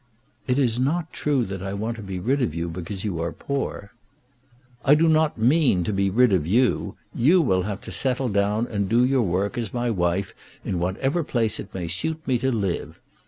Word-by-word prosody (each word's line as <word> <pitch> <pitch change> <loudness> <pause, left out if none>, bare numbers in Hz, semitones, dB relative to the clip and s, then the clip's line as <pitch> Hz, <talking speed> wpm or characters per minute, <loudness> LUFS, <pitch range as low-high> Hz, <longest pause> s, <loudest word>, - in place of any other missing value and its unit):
"It 125 0 +1
is 120 -4 +2
not 160 +5 -1
true 140 -5 0
that 95 -1 -6
I 95 0 -4
want 110 +3 -3
to - - -7
be 95 -2 -5
rid 135 +9 0
of 85 -11 -1
you 85 +1 -2
because 90 +3 -6
you 90 -6 -2
are 85 0 -2
poor." 135 -6 -4 0.9
"I 145 - +6
do 165 +2 +3
not 160 -1 +3
mean 125 - +3
to 105 - -2
be 100 0 +1
rid 120 +2 +4
of 80 -5 +1
you. 120 +7 +1 0.2
You 160 +10 +4
will 95 - +2
have 100 +1 -4
to - - -8
settle 130 -1 0
down 105 +2 +1
and 100 -5 -2
do 120 +2 +4
your 130 0 +2
work 100 +4 -1
as 115 -1 -4
my 120 0 0
wife 90 0 -1 0.3
in 90 - -1
whatever 135 - 0
place 115 -6 0
it 100 - -8
may 90 -3 -3
suit 160 - -3
me 125 -3 +2
to 130 +2 0
live. 100 -7 -2
110 Hz, 210 wpm, -24 LUFS, 95-130 Hz, 0.9 s, I